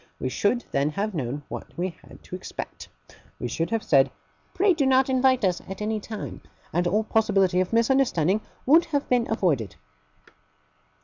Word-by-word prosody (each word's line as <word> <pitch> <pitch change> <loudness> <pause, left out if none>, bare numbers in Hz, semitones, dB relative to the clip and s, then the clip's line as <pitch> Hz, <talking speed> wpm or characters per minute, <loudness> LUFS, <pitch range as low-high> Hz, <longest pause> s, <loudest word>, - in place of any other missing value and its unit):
We 130 - -2
should 220 - 0
then 140 +2 +1
have 200 +7 -2
known 145 -2 -3
what - - -8
we 175 -1 -2
had - - -15
to - - -7
expect. - - -7 0.5
We 125 - -4
should 165 +8 -2
have 225 -1 -1
said 135 -2 +4 0.4
"Pray 385 +1 +3
do 290 -5 +1
not 265 0 +4
invite 260 -3 +3
us, 180 -2 0
at 190 - -6
any 215 +1 -1
time"; 210 0 -7 0.3
and 175 +2 +1
all 210 +5 +2
possibility 195 -5 +2
of 185 - -2
misunderstanding 230 - +2 0.2
would 320 +6 +6
have 290 -3 -1
been 245 -2 +2
avoided. 150 - 0
210 Hz, 170 wpm, -25 LUFS, 170-250 Hz, 0.5 s, would